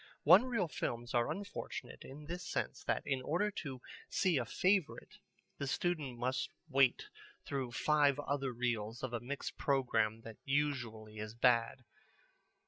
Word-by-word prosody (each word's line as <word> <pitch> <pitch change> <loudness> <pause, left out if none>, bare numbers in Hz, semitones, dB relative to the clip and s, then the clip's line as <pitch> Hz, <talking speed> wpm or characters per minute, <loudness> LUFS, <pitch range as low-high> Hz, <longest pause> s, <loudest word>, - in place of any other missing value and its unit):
One 180 - +8
reel 230 -8 0
films 120 -5 -3
are 120 -1 +2
unfortunate 205 0 -5
in 145 +3 -10
this 175 +3 -5
sense - - -3
that - - 0
in 135 -2 0
order 175 +10 0
to 135 -9 -6 0.3
see 180 -7 +2
a 120 - -2
favorite 185 - 0 0.4
the 140 - -2
student 155 - -1
must 125 +1 -1 0.2
wait 135 -4 +4 0.4
through 130 -4 -3
five 145 +1 +3
other 140 -2 -1
reels 120 -1 -2
of 130 -2 -3
a 120 - 0
mixed 130 +5 -5
programme 115 -5 +1
that 115 -1 -10
usually 120 -7 -1
is 110 +1 -6
bad. 125 +1 +3
135 Hz, 145 wpm, -35 LUFS, 120-150 Hz, 0.4 s, One